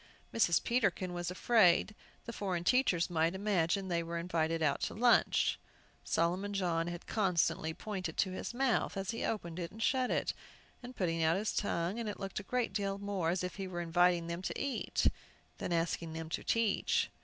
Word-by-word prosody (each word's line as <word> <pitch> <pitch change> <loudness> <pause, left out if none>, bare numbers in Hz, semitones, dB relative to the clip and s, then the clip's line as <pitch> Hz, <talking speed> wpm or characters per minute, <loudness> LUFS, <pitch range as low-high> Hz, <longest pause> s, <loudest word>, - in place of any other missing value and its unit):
Mrs. 195 -7 +3
Peterkin 200 -6 0
was 175 0 -3
afraid 190 0 +4 0.3
the 235 - -6
foreign 185 -5 -2
teachers 180 -6 +3
might 165 +1 +1
imagine 195 -1 +1
they 170 -2 0
were 170 0 -4
invited 165 -1 0
out 145 -2 +1
to - - -2
lunch. 240 +3 +3 0.4
Solomon 185 +5 0
John 170 -3 0
had 175 0 -6
constantly 180 -5 +1
pointed 185 -6 -5
to 190 - +2
his 185 - -4
mouth 245 -4 0
as 195 +1 -2
he 230 - -4
opened 175 -6 -3
it 170 -1 -3
and 220 - -13
shut 255 0 +2
it, - - 0 0.6
putting 165 -3 0
out 160 +2 +3
his 210 +2 -1
tongue; 185 +1 -1
and 225 -2 -2
it 205 - -6
looked 195 +1 -4
a - - -5
great 245 +3 -1
deal 195 -1 -1
more 200 -4 -1
as 180 +1 0
if 180 +1 -4
he 195 -1 -4
were 175 -2 -5
inviting 175 0 +3
them 170 +1 -4
to - - -4
eat, 275 - -1 0.5
than - - -3
asking 165 -1 -1
them 160 0 -5
to - - -3
teach. 230 -3 +1
180 Hz, 190 wpm, -33 LUFS, 170-205 Hz, 0.6 s, afraid